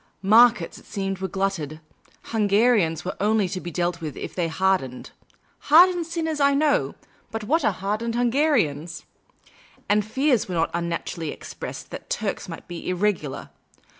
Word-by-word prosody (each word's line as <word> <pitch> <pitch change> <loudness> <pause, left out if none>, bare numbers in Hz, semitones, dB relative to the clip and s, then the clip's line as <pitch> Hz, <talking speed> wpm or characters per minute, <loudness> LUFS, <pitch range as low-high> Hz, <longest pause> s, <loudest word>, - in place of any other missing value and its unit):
Markets, 220 -2 +5
it - - -20
seemed, 195 -2 -3
were 190 - -2
glutted. 185 -6 -2 0.5
Hungarians 205 -6 +2
were 185 - -3
only 210 -1 +2
to 185 -1 -4
be 175 - -6
dealt 175 0 -2
in 155 -3 -5
if - - -6
they 175 -2 -1
hardened 165 -7 -1 0.3
— - - -39
hardened 345 +2 +6
sinners 320 -2 -2
I 280 0 +4
know, 295 0 +1 0.3
but 225 -1 -5
what 315 +10 +1
are - - +3
hardened 210 +5 -3
Hungarians? 235 - +1 0.8
And 210 +1 +3
fears 255 +2 +1
were 180 - -4
not 165 0 +1
unnaturally 170 -1 -3
expressed - - -8
that - - -8
Turks 200 -2 -3
might 165 - -9
be" 175 0 -6
irregular." 180 -6 -1
195 Hz, 155 wpm, -24 LUFS, 170-235 Hz, 0.8 s, hardened